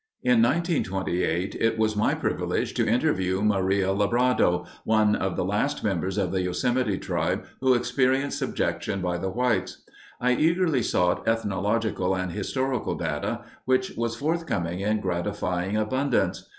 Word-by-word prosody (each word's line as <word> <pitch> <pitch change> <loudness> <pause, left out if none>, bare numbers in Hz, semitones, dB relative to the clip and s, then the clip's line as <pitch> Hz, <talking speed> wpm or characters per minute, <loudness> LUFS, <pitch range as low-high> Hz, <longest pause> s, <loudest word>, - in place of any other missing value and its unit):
In 125 -2 +4
1928 95 - 0
it 115 0 +1
was 110 -1 +1
my 105 - +2
privilege - - -1
to - - 0
interview 95 0 +1
Maria 95 -2 +2
Lebrado, 105 -4 +2 0.2
one 110 -1 +3
of 95 -1 -2
the - - -1
last 105 +9 -1
members 95 -1 -1
of 95 -3 0
the 95 - 0
Yosemite 105 +4 0
tribe - - -2
who 130 -1 +4
experienced 130 +3 +1
subjection 100 - -2
by 90 -1 -2
the 95 +2 -2
whites. 110 -3 -1 0.4
I 125 +1 +2
eagerly 165 0 +2
sought 90 -4 +1
ethnological 105 -2 0
and 95 -1 -2
historical 130 +6 -2
data, 95 +8 -3 0.2
which 130 0 +1
was 115 0 -2
forthcoming 115 - -2
in 105 +2 0
gratifying 90 +1 -2
abundance. 130 +4 0
105 Hz, 135 wpm, -26 LUFS, 95-125 Hz, 0.4 s, In